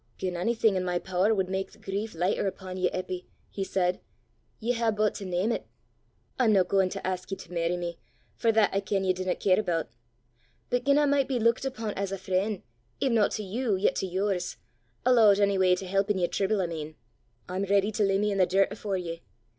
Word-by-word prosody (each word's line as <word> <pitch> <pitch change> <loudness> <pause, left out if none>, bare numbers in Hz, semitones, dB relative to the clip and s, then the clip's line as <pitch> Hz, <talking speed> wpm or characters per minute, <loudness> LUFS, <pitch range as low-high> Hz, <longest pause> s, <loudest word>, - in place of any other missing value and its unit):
"Gien 185 -1 -2
onything 220 +3 +2
i' - - +1
my 180 -1 -1
pooer 185 +3 +1
wud 190 -2 0
mak 190 +1 -2
the - - -19
grief 200 +3 -4
lichter 180 +4 0
upo' 190 -1 -6
ye, 185 0 0
Eppy," 185 -1 -5 0.2
he 195 - -3
said, 180 -2 0 0.6
"ye 235 +2 0
hae 230 -1 +1
but 215 -1 +1
to 200 - -7
name 185 +5 0
't! - - -2 0.8
I'm 240 -4 +4
no 190 -2 +5
gauin' 190 0 +2
to - - -6
ask 185 -1 -3
ye 195 - -3
to 180 - -11
merry 170 +1 0
me, 170 -1 -5 0.4
for 230 - +2
that 220 -2 +3
I 195 - +2
ken 195 0 -1
ye 185 -1 +2
dinna 185 0 -2
care 185 0 +3
aboot; 170 - -1 0.8
but 245 0 0
gien 280 0 +4
I 295 - +4
micht 280 -2 +2
be 260 -2 0
luikit 230 +3 +2
upo' 225 -5 -4
as 195 -1 -3
a 195 - -2
freen', 190 +2 -1 0.4
if 270 - +1
no 220 -3 +4
to 215 - -4
you, 215 +2 -1
yet 190 +2 +2
to 190 - -1
yours 190 0 -1 0.5
alloot 225 -5 +6
onyw'y 190 -3 +3
to 190 - -6
help 195 +2 0
i' - - +4
yer 180 -2 +1
trible, 195 +3 0
I - - 0
mean 155 -2 -6 0.5
I'm 185 +2 -2
ready 200 +1 +2
to 215 0 0
lay 195 -1 +3
me 210 0 +1
i' - - -2
the 185 -2 +4
dirt 195 +2 +2
afore 200 -3 -3
ye. 170 -2 -5
195 Hz, 225 wpm, -28 LUFS, 185-215 Hz, 0.8 s, alloot